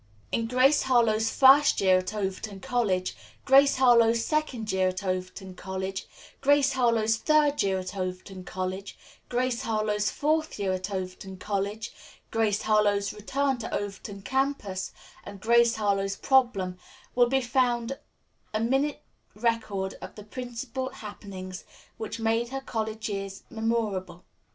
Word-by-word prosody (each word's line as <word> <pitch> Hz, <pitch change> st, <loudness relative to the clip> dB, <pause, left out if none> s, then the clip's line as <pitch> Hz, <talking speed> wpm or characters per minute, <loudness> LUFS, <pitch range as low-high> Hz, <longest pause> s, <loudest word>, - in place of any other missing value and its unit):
In 230 Hz, 0 st, 0 dB
"Grace 255 Hz, +4 st, +4 dB
Harlowe's 225 Hz, -4 st, +3 dB
First 275 Hz, +2 st, +6 dB
Year 185 Hz, -1 st, +5 dB
at 185 Hz, -, -4 dB
Overton 200 Hz, 0 st, -4 dB
College," 190 Hz, -5 st, 0 dB, 0.3 s
"Grace 275 Hz, +1 st, +6 dB
Harlowe's 235 Hz, -3 st, +5 dB
Second 270 Hz, -8 st, -1 dB
Year 190 Hz, 0 st, +2 dB
at 185 Hz, +2 st, -3 dB
Overton 185 Hz, 0 st, -4 dB
College," 190 Hz, +1 st, -5 dB, 0.3 s
"Grace 280 Hz, 0 st, +4 dB
Harlowe's 230 Hz, -4 st, +2 dB
Third 300 Hz, +1 st, +3 dB
Year 195 Hz, -1 st, +1 dB
at 185 Hz, +1 st, -5 dB
Overton 185 Hz, 0 st, -5 dB
College," 185 Hz, +2 st, -5 dB, 0.3 s
"Grace 250 Hz, 0 st, 0 dB
Harlowe's 215 Hz, -3 st, 0 dB
Fourth 310 Hz, +2 st, 0 dB
Year 195 Hz, -2 st, 0 dB
At 185 Hz, +1 st, -3 dB
Overton 190 Hz, 0 st, -5 dB
College," 200 Hz, +2 st, -3 dB, 0.4 s
"Grace 220 Hz, -2 st, +1 dB
Harlowe's 205 Hz, -2 st, +2 dB
Return 265 Hz, +5 st, -1 dB
To 225 Hz, -, -5 dB
Overton 200 Hz, 0 st, -5 dB
Campus" 265 Hz, -8 st, -1 dB, 0.3 s
and 200 Hz, -1 st, -9 dB
"Grace 235 Hz, +2 st, +4 dB
Harlowe's 195 Hz, -2 st, 0 dB
Problem," 205 Hz, -9 st, +2 dB, 0.3 s
will 245 Hz, -1 st, +4 dB
be 270 Hz, +1 st, +3 dB
found 245 Hz, 0 st, 0 dB, 0.6 s
a -, -, +2 dB
minute 270 Hz, +6 st, 0 dB, 0.3 s
record 210 Hz, -4 st, -1 dB
of -, -, -9 dB
the 210 Hz, -, -10 dB
principal 250 Hz, +3 st, -5 dB
happenings 200 Hz, -6 st, -8 dB, 0.3 s
which 220 Hz, +1 st, -5 dB
made 225 Hz, +1 st, +1 dB
her 270 Hz, +1 st, -4 dB
college 220 Hz, -3 st, -3 dB
years 195 Hz, -2 st, -5 dB
memorable. 220 Hz, -6 st, -2 dB
220 Hz, 135 wpm, -27 LUFS, 195-250 Hz, 0.6 s, First